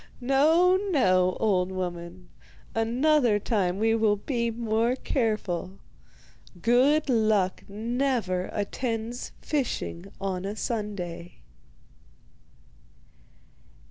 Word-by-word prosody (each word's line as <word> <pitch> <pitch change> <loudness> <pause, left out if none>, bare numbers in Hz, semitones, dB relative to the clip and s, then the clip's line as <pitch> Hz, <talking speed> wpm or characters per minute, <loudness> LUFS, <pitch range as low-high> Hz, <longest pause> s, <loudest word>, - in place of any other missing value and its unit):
No, 315 +8 +4
no, 185 - +3
old 190 -4 +1
woman, 180 -1 -6 0.4
another 240 +1 +2
time 195 -4 0
we 225 +2 +2
will 220 -2 +3
be 235 +2 -2
more 230 +1 0
careful. 205 -8 -2 0.8
Good 260 - +3
luck 215 -6 +1
never 225 -4 -1
attends 225 +3 -3
fishing 245 - -3
on 190 -2 -3
a 200 +2 -4
Sunday. 185 - -5
220 Hz, 80 wpm, -27 LUFS, 185-245 Hz, 0.8 s, No